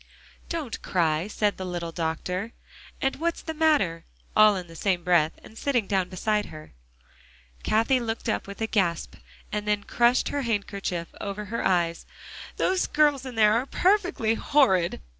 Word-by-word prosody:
"Don't 315 -8 -4
cry," 165 -1 0
said 210 -1 0
the 190 - -5
little 175 -2 -4
doctor, 180 +6 -3 0.5
"and 270 - 0
what's 335 +3 -2
the 320 - -4
matter?" 295 - +2 0.3
all 215 -1 +7
in 185 -2 -4
the 165 -1 -14
same 180 0 0
breath, 170 -3 +3
and 220 - -14
sitting 250 -7 +1
down 190 -2 0
beside 210 +3 -1
her. 155 -1 -11 0.9
Cathie 230 +4 +2
looked 225 -1 -4
up 220 - -1
with 200 +2 -9
a - - +2
gasp, 185 -7 0 0.4
and 210 0 -3
then 210 -1 +1
crushed 240 +3 +2
her 285 - -2
handkerchief 200 -7 -2
over 205 +1 -4
her 230 +3 -3
eyes. 170 -2 0 0.5
"Those 370 0 +1
girls 290 -3 +2
in 250 - -7
there 215 -1 +5
are 240 +4 0
perfectly 360 - +2
horrid." 225 - +2
210 Hz, 160 wpm, -26 LUFS, 180-250 Hz, 0.9 s, all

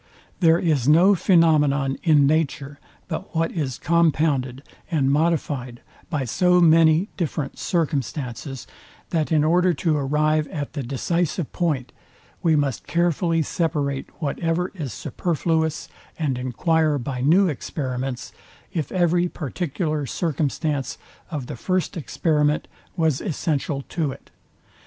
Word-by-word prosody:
There 165 -3 +5
is 155 -8 +1
no 170 +6 +6
phænomenon 150 -7 +3
in 150 -4 +4
nature, 145 -2 0 0.3
but 175 +1 -6
what 165 0 +1
is 140 -7 -3
compounded 150 -5 +1 0.3
and 140 -6 +1
modifyd 145 -5 0 0.3
by 145 -6 -1
so 180 - +3
many 165 +2 +5
different 150 -5 -3
circumstances, 140 -5 -2 0.5
that 160 -2 0
in 155 -2 +4
order 175 +2 +3
to 155 +2 +1
arrive 150 +2 +1
at 145 -2 -5
the 145 - -3
decisive 165 - -2
point, 150 -8 -1 0.5
we 160 -2 +3
must 145 -4 -1
carefully 170 -1 +1
separate 145 -4 -2
whatever 165 +3 -1
is 155 - -5
superfluous, 160 - -1 0.3
and 150 -5 -1
enquire 150 +5 +1
by 125 0 -4
new 175 +9 +4
experiments, 130 -4 -4 0.4
if 160 -7 -2
every 175 -1 +2
particular 155 -1 -3
circumstance 150 -3 -2 0.3
of 150 -7 -4
the - - -6
first 185 +8 -1
experiment 150 0 0 0.3
was 160 -5 +1
essential 150 -5 -2
to 155 -5 -1
it. - - -13
155 Hz, 120 wpm, -23 LUFS, 140-170 Hz, 0.5 s, no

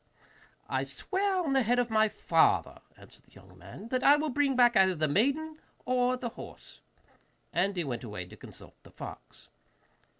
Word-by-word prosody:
'I - - -1
swear 390 0 -2
on 290 -4 -1
the 270 - +4
head 245 +1 +1
of 245 -2 0
my 220 0 +3
father,' 165 -5 +1 0.2
answered - - -17
the - - -26
young 95 -1 -17
man, 100 - -11
'that 255 0 0
I 285 +2 +7
will 300 +1 -1
bring 275 0 +1
back 240 -1 +5
either 190 -2 +4
the 155 -1 0
maiden 280 - 0 0.3
or 250 0 +1
the 245 -1 -4
horse.' 235 - -12 0.7
And 190 +3 0
he 175 - 0
went 125 -5 -5
away 105 -6 -6
to 90 - -13
consult - - -12
the - - -17
fox. - - -11
240 Hz, 180 wpm, -29 LUFS, 165-270 Hz, 0.7 s, I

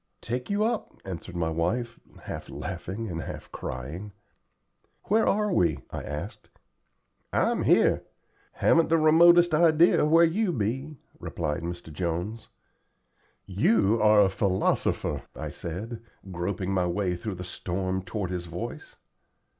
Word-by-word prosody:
"Take 125 +2 -4
you 205 +1 +1
up," 225 0 -2
answered 95 -1 -7
my 80 -2 -1
wife, 115 +9 -1 0.2
half - - -7
laughing 105 +5 -5
and 85 -4 -4
half - - -8
crying. 80 +12 -6 0.9
"Where 220 +3 +2
are 210 -1 +1
we?" 85 - +2
I - - -4
asked. 75 +1 -7 0.8
"I'm - - +1
here. - - +4 0.5
Haven't 165 0 +3
the 165 - +4
remotest 170 +2 +6
idea 160 -1 +5
where 165 +2 +6
you 185 +3 0
be," 130 +6 -2 0.2
replied 75 - -3
Mr. 85 -2 -6
Jones. 90 +7 -3 1.0
"You 105 +2 +2
are 105 -1 +6
a 100 - +4
philosopher," 95 -1 0
I - - -5
said, 110 +8 -6 0.3
groping 90 +2 -2
my 90 -2 +1
way 90 0 -1
through 100 +3 -5
the 90 - -7
storm 95 +1 -3
toward 95 -1 -4
his 90 -1 -4
voice. 85 +2 -7
100 Hz, 130 wpm, -27 LUFS, -, 1.0 s, remotest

